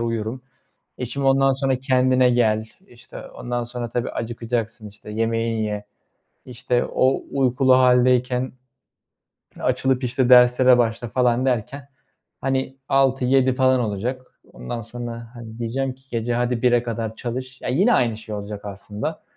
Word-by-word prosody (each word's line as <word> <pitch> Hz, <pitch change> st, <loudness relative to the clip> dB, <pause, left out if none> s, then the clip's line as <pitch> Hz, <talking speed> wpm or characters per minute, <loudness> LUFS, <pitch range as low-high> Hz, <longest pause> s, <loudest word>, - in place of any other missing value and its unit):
uyurum. 115 Hz, +1 st, -3 dB, 0.6 s
E, 125 Hz, -, -3 dB
şimdi 140 Hz, +3 st, -3 dB
ondan 135 Hz, 0 st, +4 dB
sonra 135 Hz, -1 st, 0 dB
kendine 130 Hz, -1 st, +3 dB
gel, 110 Hz, -3 st, +2 dB, 0.2 s
işte, 120 Hz, -1 st, -12 dB
ondan 120 Hz, 0 st, -4 dB
sonra, 120 Hz, 0 st, -5 dB
tabii, 120 Hz, +1 st, -2 dB
acıkacaksın, 115 Hz, -1 st, -4 dB
işte, 105 Hz, +1 st, -13 dB
yemeğini 115 Hz, 0 st, -1 dB
ye. 105 Hz, -1 st, -4 dB, 0.6 s
İşte, 120 Hz, 0 st, -1 dB
o 130 Hz, +1 st, +1 dB
uykulu 130 Hz, -1 st, +3 dB
hâldeyken 125 Hz, 0 st, +3 dB, 1.1 s
açılıp, 130 Hz, -1 st, 0 dB
işte, 125 Hz, +1 st, 0 dB
derslere 125 Hz, 0 st, +6 dB
başla 115 Hz, 0 st, 0 dB
falan 125 Hz, +1 st, +1 dB
derken, 130 Hz, +3 st, -2 dB, 0.5 s
hani, 135 Hz, 0 st, -2 dB
18.00-19.00 135 Hz, -1 st, +3 dB
falan 130 Hz, -1 st, +3 dB
olacak. 115 Hz, +4 st, -3 dB, 0.3 s
Ondan 60 Hz, -, -6 dB
sonra, 115 Hz, 0 st, -7 dB
hadi, 115 Hz, -1 st, -10 dB
diyeceğim 130 Hz, +3 st, -2 dB
ki 130 Hz, -2 st, -6 dB, 0.2 s
hadi 120 Hz, 0 st, 0 dB
gece 120 Hz, -1 st, -2 dB
01.00'e 120 Hz, -1 st, +4 dB
kadar 115 Hz, -2 st, -4 dB
çalış. 130 Hz, +2 st, -6 dB
Ya, -, -, -4 dB
yine 190 Hz, -, +3 dB
aynı 115 Hz, -3 st, +1 dB
şey 110 Hz, -1 st, -8 dB
olacak 105 Hz, 0 st, -7 dB
aslında 105 Hz, +8 st, -6 dB
125 Hz, 140 wpm, -22 LUFS, 115-130 Hz, 1.1 s, derslere